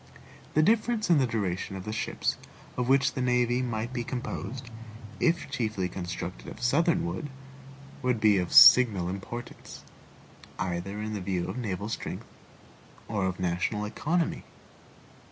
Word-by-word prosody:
The 155 - +5
difference 220 0 +2
in 160 - +6
the 130 - +2
duration 95 -4 -2
of 95 - -7
the 110 - -4
ships 115 +2 -1 0.4
of 125 0 -1
which 135 +1 +4
the 130 - -3
navy 125 0 +2
might 120 0 -3
be 120 -2 -2
composed, 125 +1 -5 0.5
if 170 0 +1
chiefly 110 -8 -1
constructed 85 -9 -6
of - - -9
Southern 160 - +2
wood, 90 +11 -4 0.7
would 125 -3 0
be 105 -2 +4
of 90 - -3
signal 105 -9 +8
importance, 100 +6 -8 0.7
either 95 +2 -3
in 110 0 -4
the 105 - -4
view 90 -2 -2
of - - -5
naval 100 -3 -3
strength 115 - -5 0.8
or 100 -4 -1
of 95 0 -4
national 90 +4 -1
economy. 160 +10 -1
110 Hz, 145 wpm, -28 LUFS, 95-130 Hz, 0.8 s, signal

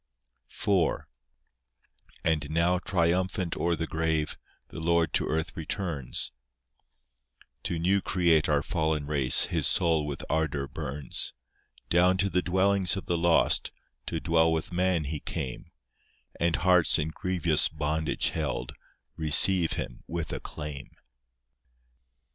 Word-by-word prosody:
IV 95 -5 0 1.2
And 75 -3 0
now 85 +3 +2
triumphant 90 0 0
o'er 85 0 0
the 80 +1 -3
grave, 80 -1 -1 0.3
The - - -8
Lord 85 -2 +1
to - - +1
earth 80 0 -2
returns; 80 -5 -2 1.3
To 85 - -1
new 95 +4 +2
create 85 -5 +2
our 75 -1 +2
fallen 80 -3 -1
race, 70 -4 +3
His - - +2
soul 80 -3 +2
with 70 -1 -5
ardour 75 -3 -1
burns; 70 +2 -4 0.6
Down 90 +2 +4
to 100 0 +1
the 90 - +2
dwellings 95 0 +1
of 95 - -6
the 85 - -1
lost, 85 0 +2 0.4
To 80 - -2
dwell 80 0 +2
with 80 +2 -2
man 90 -2 +1
He 75 +1 -3
came; 65 -2 -5 0.7
And 85 -1 +2
hearts 90 -1 +4
in 75 0 -1
grievous 85 -2 +1
bondage 75 0 -1
held, - - -3 0.4
Receive 80 +3 +5
Him - - -6
with 85 -1 -4
acclaim. 75 -3 -6
80 Hz, 125 wpm, -28 LUFS, 75-90 Hz, 1.3 s, Receive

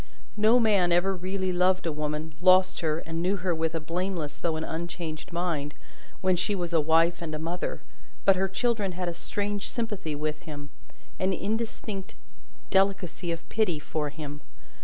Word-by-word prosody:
No 220 +3 +5
man 200 -6 +4
ever 185 +3 +3
really 185 +1 -1
loved 185 +1 +3
a 165 - +1
woman, 150 +1 -3
lost 185 0 +6
her, 155 -2 +1
and 165 0 -3
knew 185 +3 +2
her 180 -2 0
with 160 0 -1
a - - +1
blameless 165 -1 -3
though 165 -2 0
an 160 - -2
unchanged 165 -1 -4
mind, 165 -4 -1 0.5
when 185 -1 +3
she 185 +4 0
was 175 -2 -3
a 165 - +5
wife 165 +3 +3
and 155 -2 -3
a - - -1
mother, 170 +4 -3 0.4
but 195 - +7
her 190 +1 +1
children 200 -1 0
had 180 0 -3
a - - -3
strange 205 +3 -3
sympathy 210 -10 -2
with 150 +1 -2
him 145 -3 -8 0.5
an 190 +1 +2
instinctive 210 -1 -3 0.5
delicacy 190 -3 +2
of 165 0 -5
pity 215 -8 +2
for 150 0 -2
him. 145 -1 -7
175 Hz, 175 wpm, -28 LUFS, 160-195 Hz, 0.5 s, but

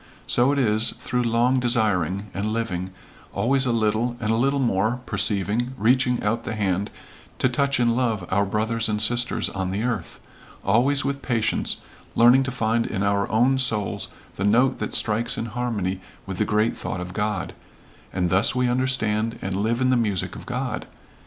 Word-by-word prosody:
So 125 +3 +3
it 145 - 0
is, 110 -3 +3
through 125 0 -2
long 120 +2 +2
desiring, 105 -6 0
and 100 +2 -2
living, 95 -5 -2 0.4
always 130 +6 +1
a - - +2
little 115 +2 0
and 110 -1 -1
a - - +3
little 135 +5 +2
more 115 -2 +1
perceiving, 110 +5 0
reaching 125 +2 +2
out 105 +3 0
the 115 - -4
hand 100 -1 -1 0.5
to - - +2
touch 135 +1 +1
in 120 -1 +2
love 115 -7 -1
our 100 +1 +3
brothers 110 +3 -1
and 105 0 0
sisters 120 +3 +2
on 95 -2 -3
the 100 +4 -2
earth, 115 -8 -3 0.5
always 130 +8 +3
with 140 0 -2
patience 120 -4 -1 0.3
learning 120 +3 +6
to 130 -1 -2
find 115 -1 0
in 95 - -2
our 100 0 +1
own 125 +5 +3
souls 115 -6 0 0.3
the 100 - -2
note 120 +6 +3
that - - -1
strikes 115 +3 0
in 115 - -2
harmony 110 -5 -2 0.2
with 95 -2 -6
the - - +2
great 105 +2 +1
thought 95 - -5
of 90 0 -6
God 105 -2 -2 0.6
and 90 -2 -1
thus 95 +7 +3
we 125 0 +2
understand 120 -3 0
and 95 0 -3
live 110 +5 0
in 130 0 +3
the - - +4
music 105 -6 -1
of - - -10
God. - - -3
115 Hz, 180 wpm, -24 LUFS, 100-125 Hz, 0.6 s, learning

